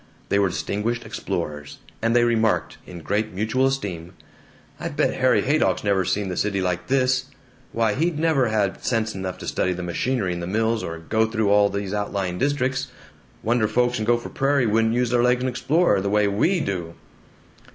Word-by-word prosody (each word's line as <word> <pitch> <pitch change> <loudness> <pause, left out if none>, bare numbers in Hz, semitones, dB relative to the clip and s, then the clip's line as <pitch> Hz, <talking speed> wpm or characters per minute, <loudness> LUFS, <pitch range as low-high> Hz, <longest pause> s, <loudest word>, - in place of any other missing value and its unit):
They 100 - +2
were 100 -1 +3
distinguished 110 +6 -2
explorers, 75 -1 -5 0.2
and 115 +1 +1
they 120 - +5
remarked, 115 -2 +1
in 90 -2 -9
great 105 +5 -1
mutual 110 +6 +1
esteem, 95 -10 -4 0.7
"I - - -3
bet - - 0
Harry - - +2
Haydock's - - +1
never 100 -2 +1
seen 100 +3 -1
the 90 - -3
City 100 0 0
like 90 -1 -2
this! 130 -1 +2 0.5
Why, 115 -2 +1
he'd 165 +5 0
never 155 -5 +2
have 105 -3 -1
sense 115 -2 0
enough 95 -1 -5
to - - -8
study 90 - 0
the 90 0 -5
machinery 95 +2 -1
in 85 - -5
the 85 - -4
mills, 110 +3 0
or 85 0 -5
go 110 +7 0
through 110 -3 0
all 100 0 +5
these 100 0 -4
outlying 100 -3 -2
districts. 135 -1 0 0.6
Wonder 115 -1 +2
folks 125 +2 +1
in 110 - -2
Gopher 120 +1 +1
Prairie 140 -1 +1
wouldn't 110 +1 +2
use 125 -1 +1
their 120 -1 +3
legs 125 +1 +3
and 130 - +1
explore, 135 - +2
the 100 - -1
way 105 0 +3
we 160 - +1
do!" 85 - -4
110 Hz, 190 wpm, -23 LUFS, 95-125 Hz, 0.7 s, they